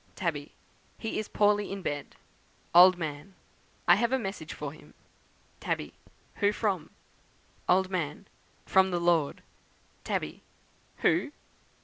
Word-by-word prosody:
"Tabby. - - -3 0.4
'He 225 - -3
is 215 - -4
poorly 205 -1 +2
in 195 -1 -5
bed.' 145 -3 -4 0.6
"Old 180 +1 +9
Man. 155 +2 -6 0.5
'I 175 - +8
have 235 +3 +1
a 265 - +3
message 195 -9 -5
for 145 -1 -6
him.' 155 - -17 0.6
"Tabby. - - -3 0.4
'Who 205 -1 +3
from?' 200 -6 -1 0.8
"Old 190 +1 +3
Man. 170 0 -3 0.4
'From 190 0 +4
the 175 -1 0
Lord.' 170 -4 +1 0.6
"Tabby. - - -3 0.6
'Who?' - - +3
185 Hz, 120 wpm, -29 LUFS, 160-205 Hz, 0.8 s, Old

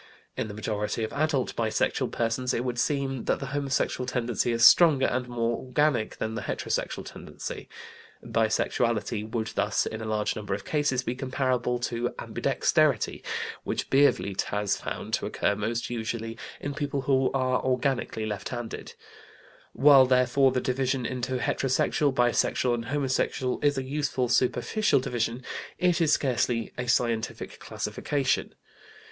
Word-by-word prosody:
In - - -2
the 105 - -7
majority 105 +1 -2
of 110 - -4
adult 145 -3 0
bisexual 110 -2 0
persons 120 +2 -1
it 120 - -1
would 120 -1 -2
seem 135 -2 -1
that - - +1
the - - -4
homosexual 135 -2 -1
tendency 120 -2 0
is 115 0 +4
stronger 155 -6 +7
and 125 0 -1
more 120 -1 0
organic 130 -3 0
than 110 - -3
the - - -3
heterosexual - - -3
tendency. - - -8 0.6
Bisexuality 110 -1 0
would 110 -1 -2
thus - - 0
in 110 0 -4
a - - -5
large 110 -1 -1
number 105 -2 -3
of - - -8
cases 145 -4 0
be 120 - -2
comparable 130 -2 -1
to 120 0 -1
ambidexterity, - - +1 0.4
which - - -3
Biervliet 135 -8 +3
has 105 -1 0
found - - -6
to - - 0
occur - - 0
most 115 +4 -2
usually 115 -1 -3 0.2
in 145 - -4
people 140 -1 -2
who 130 -1 +2
are 130 -1 +1
organically 125 -3 0
left 105 -3 -4
handed. 120 -3 -6 0.8
While 140 -2 +7
therefore 130 +1 +4
the 125 0 0
division 130 0 0
into 130 +1 -2
heterosexual, 135 +3 +1
bisexual, 120 0 +2
and 115 -1 -2
homosexual 130 -1 -1
is 145 -1 +2
a 135 - -1
useful 130 -2 -1
superficial 125 - +2
division, 120 0 -2 0.3
it 180 -1 +2
is 160 -3 +3
scarcely 120 -4 +1
a 125 0 -4
scientific 115 -2 -1
classification. 140 -2 -2
125 Hz, 145 wpm, -27 LUFS, 115-135 Hz, 0.8 s, stronger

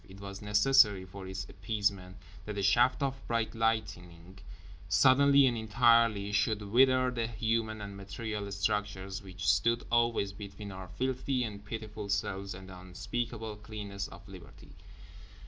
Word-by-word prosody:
It 95 +1 -12
was 100 0 -8
necessary, 105 -1 +4
for 95 +1 -9
its 95 0 -5
appeasement, 100 -1 -2 0.3
that 105 -1 -5
a 100 - -1
shaft 120 +8 +3
of 135 -1 -2
bright 115 -1 -1
lightning 95 -6 -3 0.5
suddenly 135 +7 +6
and 125 -2 +2
entirely 110 -2 +3
should 105 +1 +1
wither 130 +4 +4
the 115 -2 -2
human 110 -1 -1
and 100 -1 -7
material 100 +1 -5
structures 100 -1 -2
which 95 -1 -7
stood 115 +4 +2
always 115 -4 +2
between 100 0 -8
our 95 -1 -8
filthy 130 +4 -1
and 105 -3 -6
pitiful 105 -1 -6
selves 100 -1 -2
and 95 0 -11
the 90 -1 -10
unspeakable 110 +4 -5
cleanness 105 -2 -6
of 95 +1 -13
Liberty. 95 -3 -13
105 Hz, 145 wpm, -31 LUFS, 100-115 Hz, 0.5 s, suddenly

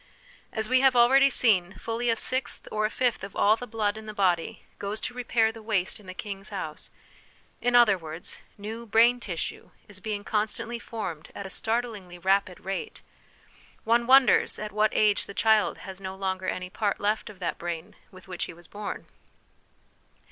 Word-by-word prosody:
As 220 -1 -3
we 255 +2 +4
have 265 -1 +5
already 265 +3 +6
seen, 190 -8 +3
fully 230 +4 -2
a 230 - +3
sixth 255 +2 -1
or 215 0 +1
a - - -7
fifth 245 -3 0
of 200 - -7
all 210 +2 +5
the 245 +2 -8
blood 215 -2 -1
in 220 0 -9
the 215 - -7
body 180 -4 0
goes 205 +2 -3
to - - -3
repair 235 -2 +1
the 225 0 -11
waste 215 -4 -1
in 205 - -16
the 185 - -8
king's 195 -1 -6
house; - - -6 0.7
in 245 0 +2
other 220 -6 +6
words, 160 +1 -8 0.2
new 220 +3 -7
brain 235 +3 +5
tissue 180 -8 -5 0.2
is 200 -3 -10
being 205 +1 -4
constantly 220 +3 -1
formed 190 -10 -6
at 200 - -6
a 190 - -6
startlingly 220 -6 -2
rapid 190 0 +1
rate: 195 - -4 0.8
one 235 +1 +2
wonders 265 -2 +6
at 215 0 -5
what 215 +1 +3
age 210 -1 +2
the 200 - -9
child 220 0 +3
has 190 0 -8
no 190 0 -5
longer 190 -1 -2
any 185 0 -3
part 205 -1 -1
left 210 +2 0
of 210 - -11
that 170 -4 -3
brain 175 +3 -5
with 185 -1 -15
which 180 -2 -4
he - - -9
was 170 0 -12
born. 205 0 -6
210 Hz, 185 wpm, -27 LUFS, 190-230 Hz, 0.8 s, already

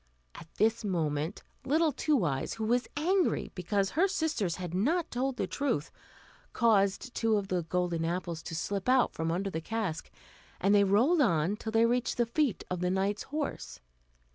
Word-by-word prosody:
At 160 - -11
this 225 +1 +2
moment 160 -2 -2 0.2
little 315 +3 +2
Two 280 - +1
Eyes, 135 -3 -2
who 220 - -4
was 240 +2 +1
angry 360 +4 +1
because 195 +2 -1
her 360 +5 +3
sisters 315 - -1
had 180 -2 -6
not 310 - 0
told 255 +1 -1
the - - 0
truth, 185 - -2 0.6
caused 210 +1 +2
two 225 -2 +2
of 195 -1 -3
the 180 -1 0
golden 175 0 -1
apples 170 -1 -3
to 165 - -5
slip 195 +6 -2
out 255 -1 +4
from 160 0 -2
under 195 +3 -2
the 160 - -3
cask, 195 -4 -3 0.5
and 195 +2 +3
they 205 -1 +6
rolled 240 - +3
on 170 - +2
till 220 +1 -6
they 225 +1 +4
reached 245 +2 0
the 240 - +3
feet 245 0 0
of 180 - -3
the 180 0 0
knight's 195 +2 0
horse. 295 0 -4
205 Hz, 180 wpm, -30 LUFS, 180-250 Hz, 0.6 s, they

